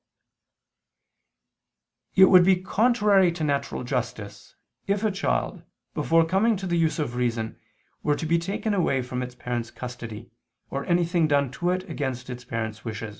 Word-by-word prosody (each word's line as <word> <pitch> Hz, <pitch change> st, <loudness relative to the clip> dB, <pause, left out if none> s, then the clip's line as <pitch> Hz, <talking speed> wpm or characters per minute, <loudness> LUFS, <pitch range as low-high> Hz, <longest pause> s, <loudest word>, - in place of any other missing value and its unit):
Hence 190 Hz, -, +7 dB
it -, -, +3 dB
would 180 Hz, -1 st, +8 dB
be 190 Hz, +1 st, +5 dB
contrary 205 Hz, -1 st, +3 dB
to 165 Hz, -2 st, -4 dB
natural 140 Hz, -3 st, -1 dB
justice, 115 Hz, -5 st, -5 dB, 0.3 s
if 200 Hz, +1 st, 0 dB
a 215 Hz, -, +2 dB
child, 195 Hz, +1 st, -1 dB, 0.3 s
before 165 Hz, 0 st, +3 dB
coming 200 Hz, +6 st, +2 dB
to 190 Hz, -, -6 dB
the 175 Hz, -2 st, 0 dB
use 165 Hz, -1 st, +1 dB
of 150 Hz, -7 st, -2 dB
reason, 120 Hz, -2 st, -2 dB, 0.4 s
were 150 Hz, -, +1 dB
to 160 Hz, -, -4 dB
be 170 Hz, +2 st, +2 dB
taken 200 Hz, +5 st, -2 dB
away 140 Hz, -9 st, +1 dB
from 125 Hz, 0 st, -4 dB
its 125 Hz, 0 st, -6 dB
parents' 120 Hz, -2 st, -4 dB
custody, 120 Hz, -2 st, -8 dB, 0.4 s
or 140 Hz, 0 st, -3 dB
anything 175 Hz, -1 st, +2 dB
done 140 Hz, -3 st, +2 dB
to 175 Hz, +7 st, -2 dB
it 185 Hz, +1 st, -1 dB
against 130 Hz, -3 st, -4 dB
its 125 Hz, 0 st, -7 dB
parents' 110 Hz, -2 st, -4 dB
wish. 110 Hz, -2 st, -5 dB
150 Hz, 165 wpm, -25 LUFS, 125-185 Hz, 0.4 s, would